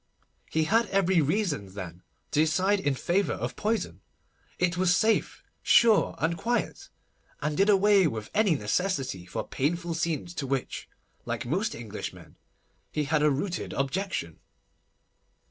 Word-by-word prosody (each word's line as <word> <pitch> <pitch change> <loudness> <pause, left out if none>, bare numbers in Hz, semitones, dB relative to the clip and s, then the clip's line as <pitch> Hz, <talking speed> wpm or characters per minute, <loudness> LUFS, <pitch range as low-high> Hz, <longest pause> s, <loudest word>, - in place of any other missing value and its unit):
He 160 - +1
had 225 +7 +2
every 190 -3 +3
reason, 145 - -1
then, 90 -3 -7 0.3
to - - +1
decide 185 +6 +3
in 145 -7 0
favour 185 +8 0
of - - -4
poison. 220 +1 -2 0.6
It 180 -1 +1
was 180 0 +3
safe, 220 0 +1 0.2
sure, 225 -3 +5
and 165 +1 0
quiet, 240 +7 -2 0.5
and 150 0 -2
did 195 +5 +3
away 200 -2 +5
with 110 -6 -5
any 205 -6 +3
necessity 130 - -1
for - - -4
painful 170 +5 -1
scenes, 165 0 -2
to 135 - -4
which, 135 -1 -3 0.4
like - - -3
most - - -1
Englishmen, - - -8 0.6
he 150 - -1
had 150 +1 +1
a 150 - +5
rooted 170 +7 -2
objection. 140 - -2
170 Hz, 140 wpm, -28 LUFS, 140-195 Hz, 0.6 s, sure